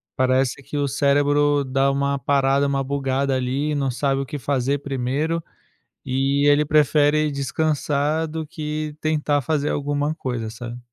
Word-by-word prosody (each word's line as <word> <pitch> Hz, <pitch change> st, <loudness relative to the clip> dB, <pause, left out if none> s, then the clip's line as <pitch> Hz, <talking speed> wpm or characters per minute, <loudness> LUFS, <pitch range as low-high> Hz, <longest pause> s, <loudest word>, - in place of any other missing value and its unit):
parece 130 Hz, +1 st, +1 dB
que 145 Hz, +2 st, -6 dB
o 140 Hz, -1 st, +1 dB
cérebro 145 Hz, +1 st, +2 dB
dá 135 Hz, +1 st, +1 dB
uma 140 Hz, 0 st, 0 dB
parada, 140 Hz, +1 st, +2 dB
uma 135 Hz, -1 st, 0 dB
bugada, 135 Hz, 0 st, -1 dB
ali, 130 Hz, +4 st, -1 dB
e -, -, -1 dB
não 135 Hz, -2 st, 0 dB
sabe 135 Hz, +2 st, 0 dB
o -, -, -3 dB
que 145 Hz, +2 st, -6 dB
fazer 140 Hz, +1 st, 0 dB
primeiro 140 Hz, +5 st, -2 dB, 0.6 s
e 135 Hz, +2 st, +1 dB
ele 145 Hz, +1 st, +5 dB
prefere 150 Hz, 0 st, +3 dB
descansar 150 Hz, +2 st, 0 dB
do 160 Hz, 0 st, -5 dB
que 155 Hz, -2 st, -5 dB
tentar 150 Hz, -2 st, +1 dB
fazer 150 Hz, +2 st, -1 dB
alguma 145 Hz, +1 st, -1 dB
coisa, 120 Hz, -7 st, -4 dB
sabe. 120 Hz, +1 st, -8 dB
140 Hz, 155 wpm, -22 LUFS, 135-150 Hz, 0.6 s, ele